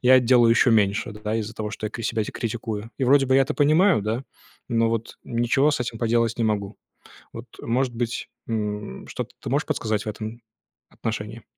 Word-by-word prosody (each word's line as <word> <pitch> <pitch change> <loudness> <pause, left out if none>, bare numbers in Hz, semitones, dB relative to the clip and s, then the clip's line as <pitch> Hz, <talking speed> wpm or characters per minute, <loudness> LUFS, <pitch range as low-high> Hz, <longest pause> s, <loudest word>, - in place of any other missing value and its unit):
я 130 +1 +7
делаю 120 -1 +5
еще 115 +1 +5
меньше, 105 +1 +2
да, 105 +1 -4
из-за 110 0 -4
того, 105 -1 -4
что 110 - -4
я - - -5
кри 115 - -6
себя 110 - 0
критикую. 110 -1 -4
И 135 - +1
вроде 135 +2 +5
бы 130 - +3
я 135 - +6
это - - -2
понимаю, 155 - +4
да, 110 +5 -2 0.5
но 115 -2 +2
вот 115 0 -3
ничего 120 +5 +2
с 145 - -1
этим 115 -2 -3
поделать 115 0 +1
не 115 - +1
могу. 105 -1 -1 0.6
Вот, - - -7 0.2
может 125 +1 0
быть, 120 -1 -3 0.2
м, 105 - -3
что-то - - -5
ты - - -6
можешь - - +1
подсказать 110 -1 -1
в - - -10
этом 110 +2 -6 0.5
отношении? 110 0 -5
115 Hz, 195 wpm, -24 LUFS, 110-125 Hz, 0.6 s, я